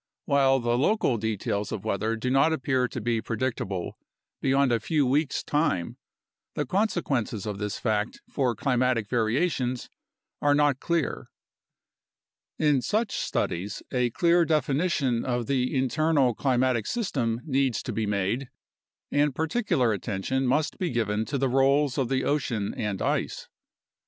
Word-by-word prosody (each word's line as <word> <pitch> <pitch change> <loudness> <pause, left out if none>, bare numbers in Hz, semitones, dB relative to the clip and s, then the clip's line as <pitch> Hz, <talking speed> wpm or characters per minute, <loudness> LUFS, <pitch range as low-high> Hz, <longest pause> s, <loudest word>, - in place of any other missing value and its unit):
While 135 -1 +3
the 120 0 0
local 150 - +2
details 105 -1 -2
of 105 0 -5
weather 110 +2 0
do 125 +3 -2
not 135 +4 +4
appear 130 -4 +1
to - - -6
be 115 -2 0
predictable 110 -6 -3 0.4
beyond 135 -1 +3
a 115 - +2
few 150 +5 +1
weeks' 140 +3 +1
time, 145 - 0 0.6
the 150 - -1
consequences 140 - -1
of 105 -2 -4
this 105 -1 -3
fact 110 -1 -1
for 125 -5 0
climatic 125 -2 +1
variations 125 +2 0 0.5
are 145 0 +4
not 145 -2 +3
clear. 170 -3 -1 1.3
In 150 -4 +3
such 215 - 0
studies 100 +4 -2
a 125 -1 +1
clear 170 +7 +3
definition 150 -5 +1
of 120 -2 -1
the 130 +1 0
internal 135 0 +2
climatic 125 -2 +1
system 130 - -1
needs 135 -4 0
to - - -4
be 110 -1 -1
made, 105 +6 -1 0.6
and 145 -2 +2
particular 160 - +1
attention 110 +6 -2
must 150 +7 0
be 180 -3 0
given 110 -2 0
to 140 +6 -2
the 135 0 +1
roles 135 +2 +2
of 130 -3 0
the 130 -1 +1
ocean 120 -8 -1
and 105 -3 -3
ice. - - -1
130 Hz, 140 wpm, -26 LUFS, 115-145 Hz, 1.3 s, not